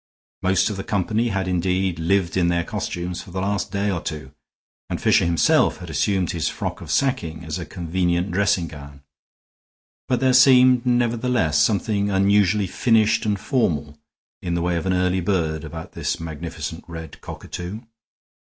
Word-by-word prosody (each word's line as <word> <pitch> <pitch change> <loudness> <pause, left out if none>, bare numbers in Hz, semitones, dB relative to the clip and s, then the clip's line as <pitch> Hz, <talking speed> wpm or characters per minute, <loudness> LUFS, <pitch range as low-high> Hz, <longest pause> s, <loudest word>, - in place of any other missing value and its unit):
Most 95 +2 +2
of 100 - -5
the 95 - -4
company 110 +4 0
had 95 -4 -1
indeed 90 -1 0
lived 85 +1 +1
in 90 -2 +2
their 85 0 +1
costumes 85 +1 -4
for - - -13
the 95 +2 -4
last 100 0 -2
day 100 0 0
or 90 -4 -2
two, 75 -4 -6 0.6
and - - -3
Fisher - - +3
himself 85 -1 +3
had - - -9
assumed 95 -4 0
his 85 -3 -1
frock - - -5
of - - -9
sacking 85 - -1
as 80 -1 -4
a - - -6
convenient 90 +1 -1
dressing 95 -2 +1
gown; 70 -3 -12 1.0
but 125 - +1
there 130 -1 +3
seemed, 130 -1 +6
nevertheless, 120 -9 +2
something 100 +2 +1
unusually 100 +1 +3
finished 110 +2 +2
and 105 -2 0
formal, 75 - -1 0.5
in 85 -1 -2
the 85 - -1
way 90 0 0
of 85 +2 -2
an 95 - +2
early 90 0 +1
bird, 80 -4 -1
about 80 +1 -8
this - - -3
magnificent 80 0 -6
red 80 -1 -9
cockatoo. 90 +5 -7
90 Hz, 165 wpm, -22 LUFS, 85-105 Hz, 1.0 s, seemed